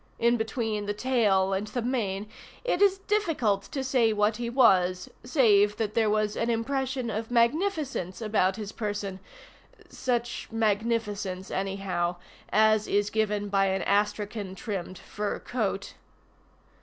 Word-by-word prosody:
In 235 +1 +3
between 220 -2 -2
the 205 - -1
tail 205 -6 +2
and 195 +2 -2
the 240 +4 -3
mane 215 -5 -1 0.4
it 450 -7 0
is 395 -1 +5
difficult 330 - 0
to 270 - -4
say 255 -4 +3
what 210 0 +1
he 240 -1 -3
was, 185 -8 +3
save 210 -6 +4
that 215 -2 -2
there 225 -2 +2
was 215 0 +1
an 230 - -1
impression 255 +1 -1
of 220 +2 -4
magnificence 250 - 0
about 205 -4 +1
his 210 -1 -6
person 205 -3 -4 0.7
such 240 -2 -2
magnificence, 210 -3 -1
anyhow, 190 -3 -1 0.4
as 215 0 +4
is 205 0 +1
given 210 -1 0
by 195 -1 +2
an 190 -1 0
astrakhan 205 -1 -1
trimmed 190 -3 -5
fur 210 +3 -4
coat. 200 -5 -3
215 Hz, 135 wpm, -27 LUFS, 200-235 Hz, 0.7 s, is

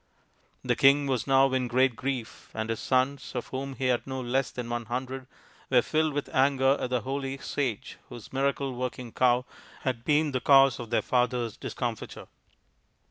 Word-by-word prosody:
The - - +1
king 140 +1 +5
was 130 -4 -1
now 135 0 +4
in 130 -1 +1
great 130 0 +2
grief, 130 -2 -5
and 110 +1 -2
his 115 - -3
sons, 130 +2 0
of 120 - -4
whom 135 +1 -4
he 135 - -3
had 125 0 +1
no 130 0 -4
less 130 +1 0
than 125 -2 -6
one 120 0 -3
hundred, 130 +2 -4 0.4
were 125 -2 +4
filled 155 -1 +1
with 145 0 -2
anger 135 -1 +3
at - - -2
the 125 -1 0
holy 135 0 -3
sage 130 -6 -3
whose 120 -2 -11
miracle 135 0 0
working 125 -1 -5
cow 125 +1 +2 0.4
had 125 -3 -2
been 150 +1 +2
the 130 -1 -1
cause 135 -2 +6
of 120 -2 -7
their 115 - +1
father's 125 -2 0
discomfiture. 120 -4 -5
130 Hz, 180 wpm, -28 LUFS, 120-135 Hz, 0.4 s, cause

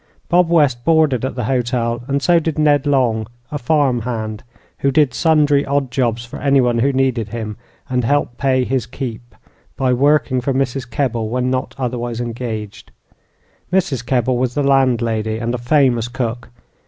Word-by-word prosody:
Bob 175 -1 +3
West 145 -8 +2
boarded 155 -5 +3
at 130 - -3
the 125 - -3
hotel, 120 -1 -1
and 140 0 -1
so 175 -1 +4
did 160 -2 -3
Ned 145 -2 +3
Long, 120 -6 +1 0.2
a 145 - -3
"farm 135 -2 +1
hand," 110 -2 -4 0.4
who 140 - +2
did 140 -2 +2
sundry 150 -2 +3
odd 140 -2 -1
jobs 120 -1 -1
for 120 - -9
anyone 130 -4 +2
who 135 +4 +2
needed 130 -5 0
him, 110 -2 -5 0.3
and 125 -1 -1
helped 125 -1 0
pay 130 -2 +2
his 125 -3 -1
"keep" 120 -4 -7 0.4
by 130 -1 +1
working 140 0 +2
for 135 +1 -1
Mrs. 135 -1 -2
Kebble 115 -4 -1
when 125 +2 -1
not 130 0 -2
otherwise 120 -2 -3
engaged. 110 -3 -5 0.8
Mrs. 175 -10 0
Kebble 125 0 0
was 125 -1 -1
the 145 - +1
landlady, 115 -5 +1
and 115 +1 -2
a 125 - -2
famous 120 -2 +2
cook. 120 -1 -4
125 Hz, 165 wpm, -18 LUFS, 120-140 Hz, 0.8 s, so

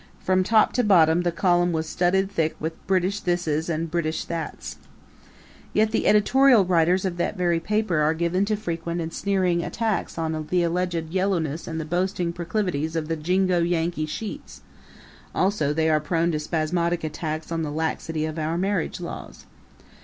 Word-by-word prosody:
From 185 0 +2
top 215 +3 +3
to 250 - +2
bottom 175 -5 +5
the 175 -1 0
column 175 0 +2
was 160 0 -1
studded 190 +4 +1
thick 160 -5 0
with 160 +1 -3
British 190 +1 +1
thises 170 -3 -1
and 165 0 -2
British 160 -2 -1
thats. 165 -2 -5 1.0
Yet 215 0 +3
the 225 - 0
editorial 240 +1 +5
writers 180 +1 +2
of 180 -2 -2
that 175 +3 -1
very 175 -2 +1
paper 210 -1 0
are 150 +2 +2
given 170 +3 +1
to 215 +1 0
frequent 170 -4 -4
and 165 -1 -4
sneering 185 -4 +1
attacks 225 -3 -2
on 160 -1 -2
the 180 -1 +2
alleged 170 -1 -1
yellowness 170 -5 -1
and 160 -1 -4
the 160 - -4
boasting 175 +1 -1
proclivities 170 -3 -2
of 160 -1 -2
the 165 - 0
jingo 180 +3 +1
Yankee 170 -2 0
sheets; 210 +7 -7 0.7
also, 185 -7 +1
they 160 +1 +1
are 155 -1 +3
prone 165 +3 0
to 155 - -1
spasmodic 170 +2 -1
attacks 155 +1 -4
on 165 -1 -1
the 155 - -2
laxity 160 0 -2
of 155 +1 -4
our 160 +2 -1
marriage 190 -1 -1
laws. - - -8
170 Hz, 170 wpm, -24 LUFS, 160-185 Hz, 1.0 s, bottom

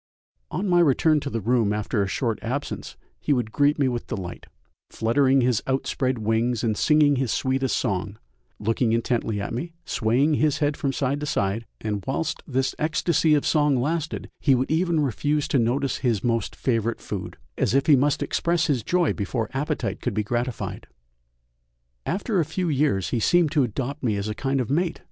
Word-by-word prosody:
On 200 - -2
my 175 -1 +4
return 155 0 +4
to 145 - -5
the 115 -4 -3
room 115 -1 +2
after 105 0 -1
a 100 - 0
short 115 +2 -1
absence 130 +5 -4 0.2
he - - -2
would 120 -4 -1
greet 145 +4 +2
me 140 -3 +2
with 120 -2 -3
delight, 90 -3 -6 0.4
fluttering 135 +4 +2
his 125 -3 +2
outspread 130 -1 0
wings 115 +2 0
and 110 -2 +1
singing 150 +2 +4
his 130 -3 0
sweetest 130 -1 0
song, 100 +1 -2 0.4
looking 115 +2 0
intently 115 -2 0
at 100 - -4
me, 165 +8 -4
swaying 125 +7 +1
his 150 -1 +2
head 145 -1 0
from 140 - -1
side 135 +1 -1
to 150 - -4
side, 105 -1 -1
and 105 -3 -3
whilst 135 +5 -2
this 130 -2 0
ecstasy 160 0 +2
of 145 - 0
song 150 -4 +3
lasted 160 +4 -2
he 135 -4 +4
would 130 +3 -1
even 165 -1 +2
refuse 145 +3 0
to 145 -6 +2
notice 130 +4 0
his 120 -6 0
most 115 -3 -1
favourite 115 -2 -1
food, - - -6 0.2
as - - +1
if 135 - +3
he 150 - +6
must 140 +2 +1
express 170 -1 0
his 135 -5 +1
joy 175 +7 +1
before 110 +1 -3
appetite 145 +3 -2
could 125 -5 -2
be 105 - +1
gratified. 120 +2 -3 1.2
After 200 +1 0
a - - +3
few 180 +3 -2
years 135 -10 +1
he 120 - +1
seemed 175 +4 +3
to 155 -2 +3
adopt 135 +4 -2
me 115 -5 0
as 100 +1 -3
a 110 - -2
kind 135 +4 -1
of 125 - -4
mate! 170 +3 0
130 Hz, 190 wpm, -24 LUFS, 115-150 Hz, 1.2 s, he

